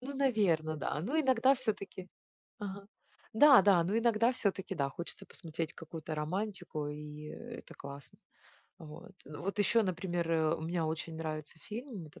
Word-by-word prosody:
Ну, 270 Hz, +3 st, -6 dB
наверно, 200 Hz, -, +2 dB
да. 150 Hz, 0 st, -2 dB
Ну 270 Hz, -, +1 dB
иногда 260 Hz, -1 st, +5 dB
все-таки 205 Hz, -7 st, -4 dB, 0.5 s
Ага. 200 Hz, -1 st, -6 dB, 0.5 s
Да-да, 205 Hz, -, +8 dB
но 205 Hz, +6 st, +1 dB
иногда 230 Hz, 0 st, +4 dB
все-таки, 195 Hz, -4 st, -1 dB
да, 140 Hz, -2 st, +1 dB
хочется 170 Hz, +5 st, -7 dB
посмотреть 160 Hz, -1 st, -5 dB
какую-то 160 Hz, -1 st, -6 dB
романтику, 180 Hz, -1 st, -3 dB
и 150 Hz, 0 st, -7 dB
это 235 Hz, +9 st, -9 dB
классно. 140 Hz, 0 st, -10 dB, 0.6 s
Вот. 155 Hz, +4 st, -11 dB
Вот 170 Hz, +8 st, -5 dB
еще, 225 Hz, +3 st, +4 dB
например, 175 Hz, -3 st, -1 dB
а, 160 Hz, 0 st, +3 dB
мне 165 Hz, +1 st, -1 dB
очень 160 Hz, +1 st, -3 dB
нравится 155 Hz, -1 st, -5 dB
фильм, 220 Hz, -, -7 dB
это 150 Hz, -, -15 dB
180 Hz, 145 wpm, -33 LUFS, 155-220 Hz, 0.6 s, Да-да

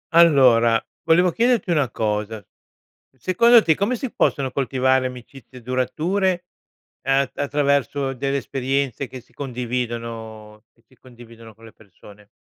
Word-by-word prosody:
Allora, 125 Hz, -8 st, +5 dB, 0.3 s
volevo 175 Hz, +2 st, +4 dB
chiederti 230 Hz, -3 st, +1 dB
una 145 Hz, -6 st, +1 dB
cosa. 105 Hz, -2 st, -3 dB, 0.7 s
Secondo 230 Hz, -, +5 dB
te 160 Hz, -, +3 dB
come 200 Hz, +10 st, -1 dB
si 245 Hz, 0 st, -5 dB
possono 135 Hz, -2 st, 0 dB
coltivare 130 Hz, -1 st, +1 dB
amicizie 125 Hz, 0 st, -10 dB
durature, 175 Hz, -, -1 dB, 0.6 s
ehm, 135 Hz, 0 st, +1 dB
attraverso 140 Hz, -1 st, 0 dB
delle 135 Hz, +2 st, -2 dB
esperienze 135 Hz, -1 st, -2 dB
che 130 Hz, -, -9 dB
si 120 Hz, -, -28 dB
condividono 115 Hz, -4 st, -6 dB
che -, -, -33 dB
si 130 Hz, -, -26 dB
condividono 115 Hz, -3 st, -15 dB
con 115 Hz, +2 st, -17 dB
le 110 Hz, -, -14 dB
persone? 105 Hz, 0 st, -18 dB
130 Hz, 125 wpm, -21 LUFS, 115-145 Hz, 0.7 s, Allora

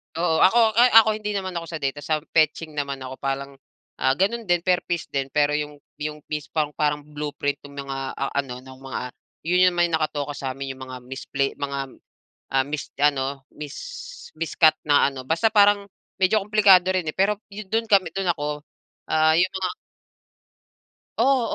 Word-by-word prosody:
Oo, 165 Hz, -1 st, +1 dB
ako 230 Hz, +5 st, +5 dB, 0.2 s
ay 245 Hz, +1 st, +6 dB
ako 225 Hz, 0 st, +8 dB
hindi 210 Hz, -1 st, -4 dB
naman 190 Hz, -3 st, -3 dB
ako 170 Hz, -, -4 dB
sa 165 Hz, -2 st, -6 dB
data 135 Hz, +1 st, -1 dB
sa 155 Hz, +1 st, -1 dB
fetching 155 Hz, 0 st, 0 dB
naman 140 Hz, -2 st, -3 dB
ako 130 Hz, 0 st, -7 dB
parang, 135 Hz, 0 st, -4 dB, 0.4 s
ah, 130 Hz, -, +2 dB
gano'n 220 Hz, +10 st, 0 dB
din 175 Hz, -2 st, +2 dB
per 180 Hz, 0 st, +1 dB
piece 175 Hz, -2 st, -3 dB
din. 135 Hz, -1 st, -1 dB
Pero 150 Hz, 0 st, +2 dB
yung 150 Hz, -1 st, -5 dB, 0.2 s
yung 150 Hz, 0 st, -5 dB
piece 150 Hz, -2 st, -3 dB
pang 155 Hz, -2 st, +1 dB
parang 150 Hz, 0 st, -1 dB
blueprint 145 Hz, -1 st, -3 dB
ng 140 Hz, -, -12 dB
mga, 135 Hz, -1 st, -5 dB, 0.2 s
ah, 135 Hz, -, -3 dB
ano 125 Hz, -3 st, -3 dB
ng 130 Hz, 0 st, -13 dB
mga 135 Hz, 0 st, -6 dB, 0.4 s
yun 180 Hz, +2 st, +4 dB
naman 175 Hz, 0 st, +2 dB
nakatoka 150 Hz, -3 st, -2 dB
sa'min 135 Hz, 0 st, -4 dB
'yong 130 Hz, 0 st, -9 dB
mga 130 Hz, 0 st, -8 dB
misplay 135 Hz, +2 st, -2 dB
mga, 140 Hz, -2 st, -4 dB, 0.6 s
ah, 135 Hz, 0 st, +3 dB
mis 145 Hz, 0 st, -5 dB
ano, 140 Hz, -1 st, +1 dB, 0.2 s
mis 150 Hz, -1 st, -7 dB, 0.6 s
miscut 160 Hz, 0 st, +3 dB
na 145 Hz, -1 st, +4 dB
ano, 130 Hz, -2 st, -9 dB
basta 165 Hz, +10 st, +2 dB
parang 205 Hz, -1 st, +4 dB, 0.3 s
medyo 190 Hz, +3 st, +4 dB
kumplikado 195 Hz, -3 st, +5 dB
rin 185 Hz, -3 st, 0 dB
eh, -, -, -6 dB
pero 200 Hz, +2 st, +2 dB
yu 205 Hz, +1 st, -8 dB
do'n 225 Hz, +3 st, -1 dB
kami 190 Hz, -5 st, +3 dB
do'n 195 Hz, -2 st, -1 dB
ako, 150 Hz, 0 st, -3 dB, 0.5 s
ah, 155 Hz, 0 st, +4 dB
'yong 185 Hz, +1 st, +3 dB
mga 185 Hz, -1 st, -2 dB, 1.5 s
Oo, 265 Hz, +1 st, +4 dB
150 Hz, 180 wpm, -24 LUFS, 140-185 Hz, 1.5 s, ako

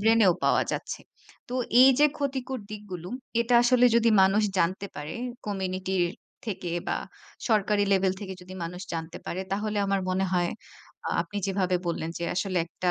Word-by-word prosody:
ব্রেনেও 220 Hz, -3 st, +5 dB
পাওয়া -, -, +4 dB
যাচ্ছে। -, -, -4 dB, 0.5 s
তো 250 Hz, -, -4 dB, 0.3 s
এইযে 270 Hz, +3 st, +7 dB
ক্ষতিকর 265 Hz, -3 st, -2 dB
দিকগুলো, 185 Hz, -5 st, -7 dB, 0.3 s
এটা 235 Hz, +1 st, +2 dB
আসলে 250 Hz, 0 st, +5 dB
যদি 230 Hz, 0 st, +4 dB
মানুষ 195 Hz, +3 st, +4 dB, 0.2 s
জানতে 185 Hz, +4 st, +1 dB
পারে 150 Hz, +2 st, -5 dB, 0.3 s
কমিউনিটির 190 Hz, -2 st, -1 dB, 0.4 s
থেকে 185 Hz, -5 st, -3 dB, 0.2 s
বা, -, -, +1 dB, 0.5 s
সরকারি 210 Hz, -2 st, +3 dB
লেভেল 190 Hz, -1 st, +3 dB
থেকে 190 Hz, -2 st, -5 dB
যদি 185 Hz, +1 st, -10 dB
মানুষ 180 Hz, +2 st, -6 dB
জানতে 165 Hz, 0 st, -4 dB
পারে 185 Hz, -, -3 dB
তাহলে 210 Hz, +1 st, -1 dB
আমার 195 Hz, 0 st, +1 dB
মনে 190 Hz, +1 st, +1 dB
হয় 175 Hz, -1 st, +2 dB, 0.6 s
আ -, -, 0 dB
আপনি 205 Hz, -, -9 dB
যেভাবে 185 Hz, -2 st, +1 dB
বললেন 165 Hz, -1 st, -2 dB
যে 170 Hz, -, -3 dB
আসলে 185 Hz, 0 st, 0 dB
একটা 180 Hz, +1 st, -3 dB
195 Hz, 160 wpm, -27 LUFS, 180-215 Hz, 0.6 s, এইযে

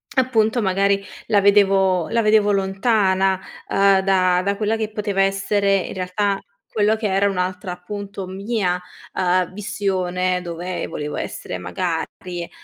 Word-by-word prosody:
appunto, 240 Hz, -3 st, +2 dB
magari 195 Hz, +1 st, +2 dB, 0.2 s
la 205 Hz, -2 st, +3 dB
vedevo 195 Hz, -3 st, +4 dB
la 230 Hz, 0 st, +2 dB
vedevo 210 Hz, -1 st, +4 dB
lontana, 195 Hz, -1 st, +2 dB, 0.3 s
ehm, 195 Hz, -1 st, +4 dB
da 185 Hz, -2 st, +3 dB
da 200 Hz, +1 st, 0 dB
quella 215 Hz, +1 st, 0 dB
che 220 Hz, -1 st, -3 dB
poteva 205 Hz, -2 st, -1 dB
essere 195 Hz, +1 st, +2 dB
in 190 Hz, -, -4 dB
realtà 195 Hz, +2 st, -1 dB, 0.3 s
quello 215 Hz, 0 st, +3 dB
che 220 Hz, -, -5 dB
era 200 Hz, 0 st, +2 dB
un'altra, 185 Hz, 0 st, -2 dB
appunto, 200 Hz, +2 st, -6 dB
mia, 190 Hz, -1 st, -2 dB, 0.3 s
ehm, 185 Hz, -1 st, +1 dB
visione 185 Hz, -3 st, -1 dB
dove 175 Hz, +1 st, -4 dB
volevo 150 Hz, 0 st, -5 dB
essere -, -, -5 dB
magari, 175 Hz, -2 st, -4 dB
195 Hz, 135 wpm, -21 LUFS, 185-205 Hz, 0.3 s, vedevo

